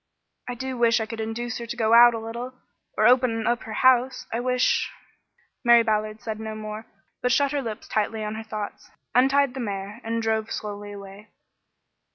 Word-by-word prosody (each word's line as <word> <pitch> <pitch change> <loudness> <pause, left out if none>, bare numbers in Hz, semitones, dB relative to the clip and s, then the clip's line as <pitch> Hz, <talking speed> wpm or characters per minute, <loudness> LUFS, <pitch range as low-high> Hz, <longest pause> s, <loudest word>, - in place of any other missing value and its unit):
"I 245 - -4
do 260 0 -5
wish 235 0 +4
I 220 - -1
could 225 +1 -7
induce 225 +2 -4
her 235 - -6
to 240 - -5
go 225 -1 +2
out 240 0 +8
a - - -3
little 235 +3 -6 0.4
or - - +3
open 245 -3 +3
up 240 +1 +1
her 220 - -6
house. 255 0 +4
I 230 - 0
wish 250 0 +1 0.4
" - - -41
Mary 235 -1 +6
Ballard 215 0 -1
said 220 -1 -4
no 220 0 -5
more, 215 +1 -7 0.3
but 250 - +1
shut 280 +1 +3
her 290 -1 -1
lips 225 -4 -6
tightly 215 +1 -1
on 210 0 -3
her 220 0 -6
thoughts, 215 -2 -7 0.2
untied 270 +1 +3
the 265 - -6
mare, 205 0 -5
and 230 +1 -2
drove 220 -1 -1
slowly 205 -1 -5
away. 200 +1 -11
225 Hz, 200 wpm, -25 LUFS, 215-245 Hz, 0.4 s, out